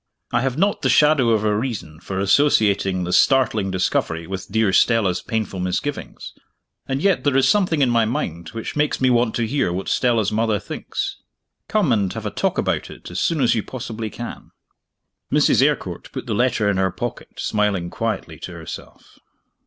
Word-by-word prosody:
I - - +2
have 135 0 -1
not 200 +4 +1
the 130 - +1
shadow 150 -2 +4
of 110 -2 +2
a 105 -1 +2
reason 105 - -4
for 95 +2 -5
associating 100 -4 +3
this 90 +1 +3
startling 125 -7 +2
discovery 90 -3 -1
with 95 +2 -6
dear 110 -2 +2
Stella's 100 -7 +3
painful 110 -5 -3
misgivings 90 +11 -4 0.5
and 135 +2 -2
yet 195 -2 +2
there 140 -2 +2
is 135 - +4
something 180 -8 +3
in 125 - +2
my 115 -1 +3
mind 85 -7 -3
which 115 -1 -6
makes 150 0 +1
me 130 -1 +3
want 120 -2 +2
to 120 - 0
hear 135 -5 0
what 95 +2 -4
Stella's 115 -5 +2
mother 110 0 +1
thinks. - - -5 0.5
Come 210 -10 +1
and 100 -5 +1
have - - -6
a - - -2
talk - - -1
about - - -1
it - - -11
as - - -3
soon 165 -4 +1
as 125 - +4
you 110 - 0
possibly 115 -2 -6
can." 120 +3 -8 0.8
Mrs. - - +4
Eyrecourt - - -1
put - - -6
the 115 - -2
letter 115 -1 +1
in 100 -2 +1
her 95 0 +2
pocket - - -6
smiling 100 -5 0
quietly - - -3
to - - -7
herself. - - -10
110 Hz, 185 wpm, -21 LUFS, 95-130 Hz, 0.8 s, shadow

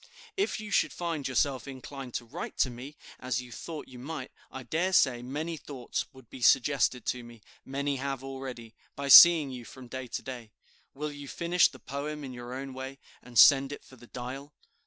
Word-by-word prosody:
If 400 - 0
you 210 -1 -7
should - - +3
find 165 -5 -3
yourself 130 -1 0
inclined 135 -1 -8
to 120 - -3
write 145 +10 -7
to 130 - +2
me, 130 +5 -10 0.2
as 125 -1 -1
you 125 -1 -9
thought 160 +4 -7
you 125 -1 -12
might, 135 0 -6 0.2
I 130 - -7
dare 175 +8 -1
say, 125 -8 +4
many 150 +6 -4
thoughts 135 -5 -4
would 130 -3 -16
be 130 - -11
suggested 130 0 +3
to 125 -1 -2
me; 120 -2 -13 0.2
many 140 +1 -2
have 135 0 -3
already, 130 -4 -7 0.2
by 140 0 -4
seeing 160 -2 +10
you 125 -2 -7
from 130 +2 -12
day 130 +1 -6
to - - -4
day. 120 -4 -7 0.5
Will 150 +2 -4
you 145 -1 -9
finish 170 +4 +3
the 130 - -13
poem 145 +4 -5
in 130 -2 -7
your 120 0 -8
own 135 0 -6
way, 130 +1 -7 0.2
and 125 -1 -9
send 135 +2 +7
it 145 - -8
for 130 - -15
the 120 -1 -16
'Dial'? 135 +4 -7
135 Hz, 200 wpm, -29 LUFS, 125-145 Hz, 0.5 s, seeing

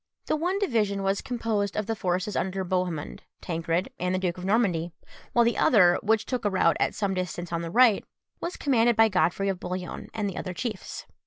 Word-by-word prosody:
The - - +1
one 350 +5 0
division 215 - 0
was 195 +1 0
composed 220 -5 -2
of 215 - 0
the 225 - -2
forces 185 +1 -1
under 190 +1 -1
Bohemund, 180 -4 -2 0.2
Tancred, 165 +1 -2
and 180 +1 0
the - - 0
Duke 180 -1 -2
of - - -8
Normandy; 190 -6 +1 0.4
while 240 -1 +5
the 235 - +1
other, 180 -7 +5
which 220 +1 +1
took 250 -3 -3
a 205 - +2
route 185 -3 +3
at - - +1
some 200 -2 -1
distance 180 -2 -4
on 170 - -1
the 165 - -4
right, 235 +2 +5 0.4
was 345 - -4
commanded 240 -4 +3
by 225 0 +5
Godfrey 180 +1 +1
of 190 -2 -1
Bouillon 180 0 -5
and 215 -2 -2
the 195 - -5
other 185 -2 -4
chiefs. 220 -4 -5
195 Hz, 210 wpm, -27 LUFS, 180-225 Hz, 0.4 s, while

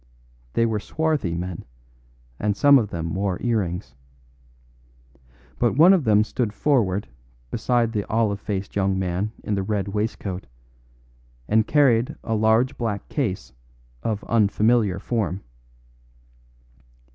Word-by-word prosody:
They 115 - +2
were 110 -2 0
swarthy 150 - -1
men, 90 0 -5 0.8
and 105 -1 0
some 140 -1 +7
of 105 -4 -2
them 85 -2 -4
wore 95 -1 -1
earrings. 100 - -2 1.7
But - - +2
one 175 +5 +8
of 180 -7 +2
them 105 -1 +4
stood 110 -1 -2
forward 105 -7 +1 0.4
beside 120 -2 +1
the 105 -3 -2
olive 110 -2 0
faced 100 -2 -4
young 95 -1 +1
man 95 +3 -1
in 105 - -2
the 100 - 0
red 100 0 -2
waistcoat, 100 -2 -3 1.0
and 110 0 +2
carried 130 -5 +3
a 115 - -2
large 110 +3 +2
black 105 -4 -3
case 100 - -3 0.5
of 105 -2 -2
unfamiliar 110 -2 +2
form. 100 -4 -2
105 Hz, 125 wpm, -23 LUFS, 95-115 Hz, 1.7 s, one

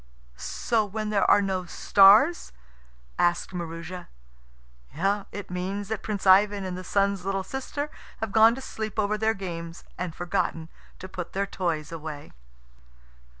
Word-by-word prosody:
"So 225 - -1
when 215 +1 -4
there 200 -2 +2
are 205 - +6
no 190 -2 -2
stars?" 205 - +5 0.7
asked 175 +2 +1
Maroosia. 170 +1 -6 1.2
"It 205 -3 -7
means 190 +3 -3
that 220 -2 -3
Prince 205 -2 -4
Ivan 200 +1 +5
and 185 -1 -4
the 185 - -6
Sun's 200 0 +1
little 195 0 -1
sister 275 +6 -4 0.3
have 220 -2 -3
gone 225 +2 +6
to 265 - -8
sleep 220 -5 -5
over 210 0 +1
their 220 +1 +1
games 170 -3 -6 0.2
and 175 -3 -4
forgotten 165 -2 -2 0.3
to 185 - -8
put 180 -2 -7
their 195 +1 0
toys 165 -6 -3
away." 155 -3 -7
195 Hz, 145 wpm, -26 LUFS, 175-210 Hz, 1.2 s, are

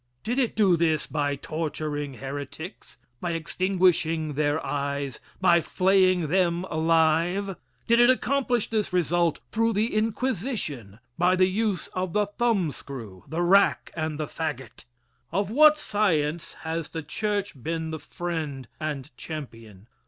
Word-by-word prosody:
Did 240 +5 -1
it 250 -4 +1
do 200 -5 +4
this 160 -2 +1
by 145 -2 -1
torturing 150 -1 -4
heretics 145 - -7 0.2
by 175 -1 -2
extinguishing 165 -2 +1
their 145 +1 +1
eyes 140 -1 -2 0.2
by 170 -2 +5
flaying 185 -1 +3
them 175 0 +2
alive? 165 +4 +2 0.3
Did 235 0 +4
it 240 +1 +7
accomplish 255 -2 +1
this 215 -3 0
result 175 -2 +1
through 225 +1 +2
the 215 +4 0
Inquisition 215 - -2 0.2
by 180 +1 +4
the 185 0 +5
use 195 -2 0
of 185 -2 -3
the 210 0 +3
thumb 205 -5 +1
screw, 115 -11 -9
the 165 +2 -1
rack 195 +3 +4
and 155 -2 -3
the 155 - -1
fagot? 135 -7 -5 0.5
Of 200 +4 0
what 305 +4 +7
science 170 - 0
has 160 -1 -3
the 160 - -5
church 200 - -2
been 160 +2 -3
the 160 - -4
friend 155 -5 -4
and 145 -5 -4
champion? 115 - -8
170 Hz, 135 wpm, -26 LUFS, 150-200 Hz, 0.5 s, it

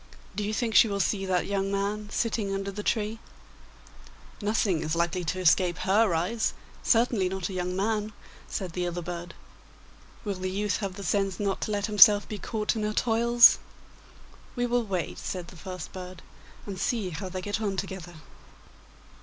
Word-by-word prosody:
Do 210 - -2
you 205 - -1
think 225 +1 -1
she 210 - +7
will 200 -1 -2
see 195 -1 0
that 180 -1 +1
young 195 -1 -1
man 205 +1 -2
sitting 220 -2 -1
under 195 0 -2
the 205 +2 -5
tree?' 215 +1 -1 1.2
'Nothing 205 -5 +1
is 155 0 -1
likely 170 +2 0
to 185 +4 -2
escape 180 -1 +3
her 195 +2 +3
eyes, 195 +8 0 0.3
certainly 225 -5 +2
not 190 0 -3
a - - -6
young 180 0 -2
man, 210 +2 -1 0.4
said 185 -4 -4
the 180 0 -1
other 175 0 -4
bird. 175 +1 -6 0.9
'Will 205 - -1
the 185 0 -4
youth 200 +2 -1
have 195 -3 -4
the 200 - -7
sense 195 0 0
not 200 -2 -1
to - - -2
let 205 -1 0
himself 210 -1 +7
be 210 - -6
caught 215 +2 -1
in 220 - -2
her 210 0 -1
toils?' 235 +1 +6 1.0
'We 245 -1 0
will 245 0 +1
wait,' 185 -4 -3
said 180 -2 -5
the - - -13
first 180 -1 -8
bird, 185 -1 -8 0.4
'and 195 -3 -6
see 205 -4 -1
how 185 +4 -5
they 185 +1 -4
get 205 +3 -2
on 200 -3 -1
together. 185 -3 -5
195 Hz, 180 wpm, -27 LUFS, 185-210 Hz, 1.2 s, she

